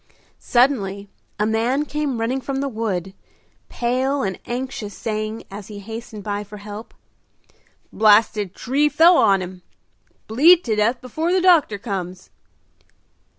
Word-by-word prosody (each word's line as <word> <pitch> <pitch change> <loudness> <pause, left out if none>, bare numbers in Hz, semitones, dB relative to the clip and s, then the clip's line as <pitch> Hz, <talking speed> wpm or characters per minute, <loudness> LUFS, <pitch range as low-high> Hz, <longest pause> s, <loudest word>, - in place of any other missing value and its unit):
Suddenly 205 -6 +1 0.3
a 210 - +2
man 235 +6 0
came 295 -5 -2
running 250 +4 -1
from 275 +1 -4
the 280 - -1
wood, 200 -7 -3 0.6
pale 260 +3 -1
and 190 -2 -3
anxious, 240 -4 -5
saying, 215 0 -4
as 200 0 -8
he 210 - -9
hastened 220 0 -8
by 205 0 -3
for 210 +1 -11
help, 205 +2 -9 1.0
"Blasted 210 -2 +3
tree 285 +4 +1
fell 335 +4 +6
on 195 -2 +4
him! 180 0 -9 0.6
Bleed 325 +11 +5
to 220 -3 -1
death 225 +4 +1
before 315 +7 -2
the 375 - +3
doctor 340 - +4
comes!" 185 -4 -6
225 Hz, 135 wpm, -21 LUFS, 205-265 Hz, 1.0 s, fell